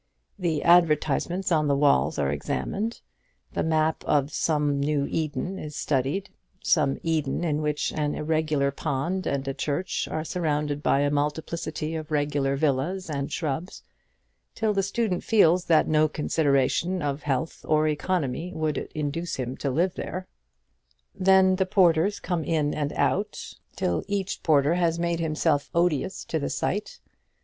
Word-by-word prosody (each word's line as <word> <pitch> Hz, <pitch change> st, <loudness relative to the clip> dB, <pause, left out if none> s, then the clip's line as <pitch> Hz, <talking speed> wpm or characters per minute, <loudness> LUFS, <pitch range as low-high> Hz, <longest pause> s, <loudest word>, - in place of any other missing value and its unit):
The 165 Hz, -5 st, 0 dB
advertisements 170 Hz, +2 st, +3 dB
on 155 Hz, -2 st, +3 dB
the 140 Hz, -, +3 dB
walls 140 Hz, -, +3 dB
are 70 Hz, -1 st, +1 dB
examined, 205 Hz, -, -3 dB, 0.5 s
the -, -, -1 dB
map 160 Hz, 0 st, +1 dB
of 145 Hz, 0 st, +1 dB
some 150 Hz, -3 st, +1 dB
new 145 Hz, 0 st, +1 dB
Eden 160 Hz, +4 st, -3 dB
is 150 Hz, -1 st, -7 dB
studied 145 Hz, +8 st, -1 dB, 0.3 s
some 145 Hz, -5 st, +2 dB
Eden 160 Hz, -2 st, 0 dB
in 155 Hz, -3 st, 0 dB
which 150 Hz, -1 st, -1 dB
an 150 Hz, -1 st, -1 dB
irregular 155 Hz, -3 st, 0 dB
pond 160 Hz, +6 st, -2 dB
and 135 Hz, -1 st, -2 dB
a 135 Hz, -, -1 dB
church 150 Hz, +7 st, -2 dB
are 155 Hz, -, -3 dB
surrounded 150 Hz, -4 st, -1 dB
by 140 Hz, -, +2 dB
a 145 Hz, 0 st, +1 dB
multiplicity 155 Hz, +2 st, -2 dB
of 155 Hz, -1 st, -5 dB
regular 145 Hz, -2 st, 0 dB
villas 155 Hz, +5 st, -1 dB
and 140 Hz, -1 st, -3 dB
shrubs 160 Hz, +4 st, -3 dB, 0.7 s
till 220 Hz, -1 st, +1 dB
the 195 Hz, -, +2 dB
student 195 Hz, -1 st, -1 dB
feels 180 Hz, -5 st, +4 dB
that 160 Hz, -2 st, +4 dB
no 155 Hz, 0 st, +4 dB
consideration 155 Hz, +3 st, +1 dB
of 145 Hz, 0 st, -2 dB
health 140 Hz, +2 st, -2 dB
or 155 Hz, 0 st, +2 dB
economy 155 Hz, 0 st, -1 dB
would 155 Hz, -1 st, -2 dB
induce 155 Hz, +3 st, -2 dB
him 130 Hz, 0 st, -4 dB
to 140 Hz, -, -2 dB
live 170 Hz, +7 st, +1 dB
there. 185 Hz, 0 st, -5 dB, 0.9 s
Then 190 Hz, 0 st, +4 dB
the 190 Hz, -1 st, +1 dB
porters 185 Hz, +1 st, +3 dB
come 175 Hz, -3 st, -2 dB
in 150 Hz, -1 st, 0 dB
and 145 Hz, -1 st, -2 dB
out, -, -, -1 dB, 0.2 s
till 85 Hz, -, -1 dB
each 200 Hz, -1 st, -2 dB
porter 150 Hz, -1 st, +3 dB
has 170 Hz, -2 st, +1 dB
made 170 Hz, 0 st, -1 dB
himself 155 Hz, -2 st, 0 dB
odious 170 Hz, +1 st, 0 dB
to 160 Hz, -, -2 dB
the 140 Hz, -, -2 dB
sight. 190 Hz, +9 st, -2 dB
155 Hz, 150 wpm, -26 LUFS, 145-175 Hz, 0.9 s, feels